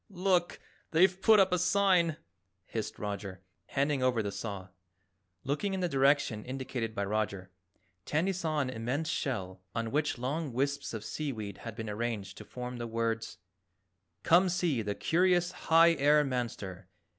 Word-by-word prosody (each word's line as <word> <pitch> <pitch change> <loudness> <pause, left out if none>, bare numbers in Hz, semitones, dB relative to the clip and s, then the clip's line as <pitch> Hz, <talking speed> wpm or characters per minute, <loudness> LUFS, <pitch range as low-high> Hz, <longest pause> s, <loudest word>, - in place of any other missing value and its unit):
"Look, 180 -2 +1 0.3
they've 185 +3 +3
put 215 +1 +6
up 190 -1 +4
a 180 - +2
sign," 180 -3 +3 0.5
hissed - - -4
Roger, 100 -2 -5 0.2
handing 140 0 0
over 125 -3 +2
the 100 - -3
saw. 100 -3 -6 0.7
Looking 150 +9 -1
in - - -2
the 180 - +1
direction 135 -6 +2
indicated 125 -3 -4
by 100 - -1
Roger, 100 -3 -2 0.5
Tandy 170 +6 +1
saw 160 -4 -1
an 130 -2 -2
immense 125 +7 -2
shell 95 -8 -3
on 115 -1 -2
which 150 -1 0
long 140 +3 -3
wisps 140 0 -1
of 110 -1 -6
sea 150 +3 -3
weed 105 -5 -6
had 115 -2 -7
been 110 -1 -5
arranged 105 -2 -3
to - - -10
form 125 0 -6
the 120 -1 -4
words: 115 -4 -2 0.9
COME 180 +3 +5
SEE 175 -8 +1
THE 105 -1 -3
CURIOUS 175 +1 +2
HIGH 165 +1 +5
AIR 150 +2 +5
MANSTER. 115 -8 -4
130 Hz, 155 wpm, -31 LUFS, 110-165 Hz, 0.9 s, put